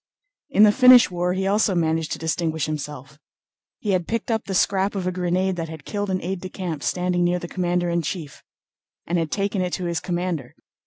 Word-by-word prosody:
In 215 -6 +5
the 210 - +7
Finnish 250 -2 +7
war 180 0 0
he 190 +1 -1
also 200 0 +2
managed 160 -2 0
to - - -4
distinguish 160 -1 -1
himself. 150 -2 -6 0.6
He 210 - -2
had 180 -3 0
picked 230 +1 -2
up 220 -1 -1
the 195 - -3
scrap 195 +2 +1
of 190 -2 -2
a 185 - 0
grenade 180 +1 0
that 165 -1 -4
had 160 -2 -9
killed 205 -1 -3
an 185 -1 -1
aide 185 +1 -3
de 185 - -6
camp 175 -6 -5
standing 180 +1 0
near 175 +1 +2
the 175 - -6
commander 175 -1 -1
in 170 0 +1
chief 155 -2 -6 0.6
and 175 +1 0
had 165 -2 -1
taken 200 +1 -1
it 180 -1 -2
to 180 - -2
his 170 -1 -1
commander. 175 -7 -3
180 Hz, 215 wpm, -23 LUFS, 165-190 Hz, 0.6 s, the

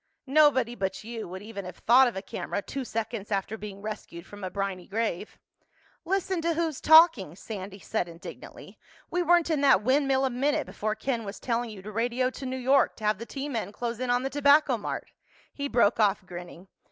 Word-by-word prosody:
"Nobody 275 -4 +4
but 195 -2 -3
you 225 0 -6
would 185 +3 -8
even 210 -2 -7
have 180 -1 -8
thought 255 +3 +6
of 240 - -3
a 190 - -5
camera 200 +1 -4
two 275 - -5
seconds 225 -3 -4
after 200 +2 -1
being 205 -2 -9
rescued 190 -5 -7
from 205 0 -11
a 185 - -2
briny 195 -2 -4
grave." 215 -2 -3 0.7
"Listen 375 -1 0
to 335 0 0
who's 320 -3 -2
talking!" 315 - +6
Sandy 195 -1 -7
said 205 -2 -2
indignantly. 170 0 -11 0.3
"We 355 - +1
weren't 345 -1 +3
in 300 -3 +1
that 270 -8 +5
windmill 270 +1 +2
a 260 - 0
minute 275 +4 0
before 215 0 -3
Ken 235 +1 -2
was 200 0 -7
telling 235 -1 -1
you 200 -3 -10
to 215 - -7
radio 240 +3 0
to 265 0 -7
New 260 +1 -3
York 265 +2 +3
to 220 - -13
have 210 -1 +1
the 230 - -7
T 275 +1 -5
men 225 -8 -3
close 235 +1 -4
in 255 -1 -2
on 245 +1 +2
the 270 - -2
Tobacco 285 -1 +4
Mart." 215 - -5 0.4
He 285 0 -3
broke 235 -5 +3
off, 205 -2 +2
grinning. 175 0 -10
230 Hz, 205 wpm, -27 LUFS, 200-270 Hz, 0.7 s, thought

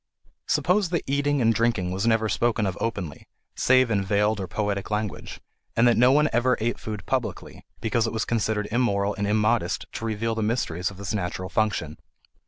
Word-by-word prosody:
Suppose 185 0 +2
that 170 -2 -1
eating 140 -1 +1
and 115 0 +4
drinking 115 -6 0
was 95 +5 -1
never 115 -1 +3
spoken 115 0 +1
of 95 -2 -2
openly, 95 - -4 0.3
save 130 -2 +4
in 100 -2 +1
veiled 105 +2 +1
or 95 - -3
poetic 100 +2 -2
language, 105 -1 -4 0.4
and 120 +1 +4
that 120 - +5
no 125 +2 +5
one 150 +2 +4
ever 125 +2 +2
ate 115 +2 -1
food 105 -3 -6
publicly, 130 -3 -3 0.2
because 115 0 +1
it - - -2
was 110 - -1
considered 110 -2 -1
immoral 105 -4 +1
and 100 -1 -2
immodest 105 -4 +1
to 115 - -5
reveal 115 +1 -1
the 110 - -2
mysteries 105 -6 -1
of 95 - -12
this 100 +1 -4
natural 95 -2 -3
function. 100 -8 -1
110 Hz, 190 wpm, -25 LUFS, 100-120 Hz, 0.4 s, that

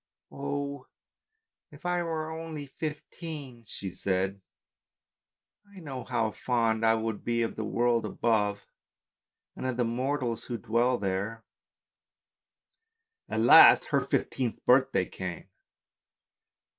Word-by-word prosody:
"Oh! 140 -1 -4 0.8
if - - -16
I 175 0 +1
were 160 -2 -3
only 160 -2 -6
fifteen!" 150 -3 -7
she 100 -2 -6
said, 95 +1 -1 1.3
"I - - -9
know 135 -7 -7
how 110 -1 0
fond 115 -1 0
I 110 0 +5
shall 110 0 -1
be 115 +2 -1
of 115 - -3
the 110 - -3
world 120 +2 +1
above, 105 -3 0 0.9
and 130 - -4
of 130 -2 -2
the 120 - +2
mortals 125 0 -2
who 120 - -4
dwell 120 +3 +1
there." 100 +3 -3 1.8
At - - 0
last - - +8
her - - +3
fifteenth 125 -4 -2
birthday 130 -7 +4
came. 95 +1 -7
120 Hz, 115 wpm, -29 LUFS, 110-140 Hz, 1.8 s, last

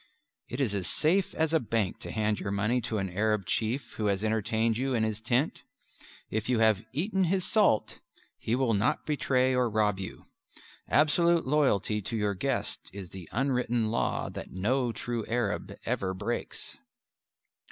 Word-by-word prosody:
(It 125 - -4
is 125 -7 +1
as 95 -3 -1
safe 180 +5 +2
as 160 0 +1
a 160 - +5
bank 110 - -1
to - - -7
hand 110 -1 0
your - - -3
money 110 +5 +1
to 115 -1 -2
an 95 -1 -1
Arab 105 +1 +1
chief 115 - -1
who 105 - 0
has 100 0 0
entertained 110 +1 +1
you 130 +2 0
in 110 - +2
his 110 -1 -2
tent. 120 +6 0 0.7
If 110 +2 -2
you 125 - +3
have 110 -2 +3
"eaten 190 - +1
his 185 +1 +1
salt" 205 - +2 0.4
he 115 - 0
will 130 -3 +2
not 105 +3 +1
betray 130 -3 +2
or 125 -2 +2
rob 105 -2 +1
you. 95 - -7 0.6
Absolute 170 +3 +4
loyalty 130 -7 +2
to 115 +4 -3
your 105 -1 +1
guest 130 +6 -2
is 95 -3 -8
the 95 -4 -9
unwritten 120 -3 +1
law 115 - 0
that - - -7
no 120 +7 0
true 115 0 -3
Arab 115 -4 -1
ever 95 -1 -1
breaks.) 105 +5 -4
115 Hz, 170 wpm, -29 LUFS, 105-130 Hz, 0.7 s, a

